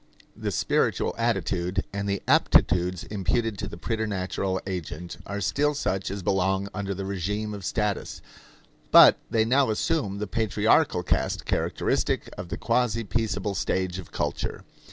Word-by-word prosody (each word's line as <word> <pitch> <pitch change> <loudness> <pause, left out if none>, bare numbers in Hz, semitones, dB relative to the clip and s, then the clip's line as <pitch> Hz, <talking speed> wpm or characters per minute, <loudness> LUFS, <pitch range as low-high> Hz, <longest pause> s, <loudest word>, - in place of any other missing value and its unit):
The - - -3
spiritual - - +1
attitude 90 +2 0
and 100 0 -2
the 100 -1 -2
aptitudes 90 +1 +3
imputed 105 +1 -1
to - - -3
the - - -8
preternatural 95 -3 -2
agent 90 -2 -5
are 100 0 -3
still 145 +9 +1
such 95 -8 -1
as 100 0 -5
belong 95 +1 +1
under 100 -1 -3
the 95 +1 -4
regime 105 +3 -2
of 100 -2 -7
status, 105 -1 -2 0.7
but - - +9
they 110 -1 +2
now 130 +2 +3
assume 110 - 0
the 105 - -2
patriarchal 110 - +2
cast - - -1
characteristic - - -1
of 90 -1 -7
the - - -4
quasi 115 -1 +1
peaceable 110 -1 -1
stage 95 +2 -1
of 90 - -10
culture. - - -3
100 Hz, 145 wpm, -26 LUFS, 95-110 Hz, 0.7 s, but